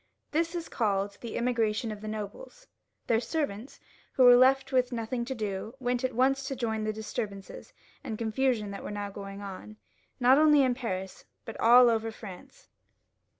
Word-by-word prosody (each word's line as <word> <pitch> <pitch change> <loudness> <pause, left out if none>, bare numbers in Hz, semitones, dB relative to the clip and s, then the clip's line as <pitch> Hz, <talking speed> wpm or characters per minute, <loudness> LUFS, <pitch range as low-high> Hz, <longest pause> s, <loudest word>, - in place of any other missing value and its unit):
This 330 +3 0
is 335 -1 -4
called 200 -3 -1
the 235 - -5
Emigration 230 -2 0
of 210 -1 -8
the 215 - -7
Nobles. 220 - -7 0.4
Their 225 -1 +2
servants, 255 -4 -4 0.3
who 260 - +3
were 245 -1 +9
left 265 +2 +4
with 255 -1 +2
nothing 235 +1 -3
to 265 +1 -4
do, 215 +1 -4
went 245 0 -1
at 255 -2 -1
once 270 +2 +2
to 270 - -3
join 230 -3 -2
in - - -3
the 215 - 0
disturbances 210 -2 -6 0.3
and 225 -6 -5
confusion 225 -2 0
that 200 - -7
were - - -6
now 205 -1 -5
going 200 0 -8
on, 200 +2 -9 0.4
not 255 +3 +5
only 300 -2 +6
in 255 -1 +2
Paris, 190 -7 -5 0.2
but 225 - -7
all 245 +2 +7
over 225 -1 +1
France. 215 - -12
230 Hz, 180 wpm, -29 LUFS, 210-260 Hz, 0.4 s, were